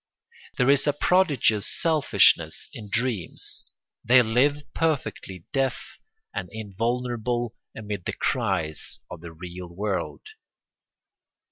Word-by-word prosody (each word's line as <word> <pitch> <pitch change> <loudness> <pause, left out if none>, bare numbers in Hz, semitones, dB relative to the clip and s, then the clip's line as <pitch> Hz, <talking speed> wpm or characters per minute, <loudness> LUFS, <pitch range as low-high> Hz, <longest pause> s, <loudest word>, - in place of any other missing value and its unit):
There 125 +2 +5
is 140 +1 +3
a 145 - +4
prodigious 145 - +3
selfishness 160 -4 +3
in 105 -3 -9
dreams: 115 -4 -2 0.3
they 125 +2 +6
live 135 +6 +2
perfectly 130 - -2
deaf 135 -1 +1 0.6
and - - -4
invulnerable 120 +2 -2 0.2
amid 105 -4 -5
the - - -2
cries 95 - -1
of - - -8
the 85 -1 -8
real 90 +2 -8
world. 95 +3 -3
115 Hz, 105 wpm, -26 LUFS, 95-130 Hz, 0.6 s, they